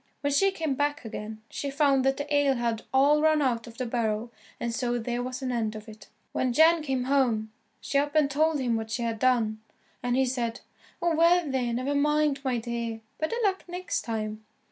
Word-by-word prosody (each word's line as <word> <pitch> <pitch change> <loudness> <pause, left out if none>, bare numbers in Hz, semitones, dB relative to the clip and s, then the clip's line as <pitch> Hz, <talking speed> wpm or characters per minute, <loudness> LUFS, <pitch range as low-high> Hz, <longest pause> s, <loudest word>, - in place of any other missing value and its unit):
When 285 -1 0
she 390 +8 +4
came 325 -7 -2
back 290 -1 -1
again, 220 0 -7
she 280 - -4
found 275 -2 +3
that 270 0 +2
the 290 0 -2
ale 285 -2 +3
had 235 -2 -1
all 285 +3 +4
run 310 0 +4
out 245 -5 0
of 230 -1 -12
the 255 - -2
barrel, 230 -1 -1 0.3
and 235 -1 -2
so 245 0 -1
there 240 +1 -2
was 255 +2 -5
an 255 - -1
end 225 -3 -1
of 215 +1 -9
it. 215 0 -12 0.2
When 255 -2 0
Jan 320 +4 +5
came 265 -4 -1
home, 245 -5 +1 0.3
she 280 - +1
up 290 +1 -2
and 305 -2 +5
told 305 +2 +1
him 245 -3 0
what 220 0 -3
she 235 +2 -2
had 230 -1 -2
done, 225 -4 +2 0.4
and 245 0 0
he 265 +1 +3
said, 240 -2 -2 0.4
"Oh 340 -1 +2
well, 335 +1 +4
there, 260 -3 -1
never 255 +4 -1
mind, 295 0 +2
my 255 -3 0
dear, 230 -1 -4 0.2
better 315 +9 -1
luck 385 -2 +1
next 360 +1 -3
time." 215 -1 -4
255 Hz, 210 wpm, -27 LUFS, 230-290 Hz, 0.4 s, Jan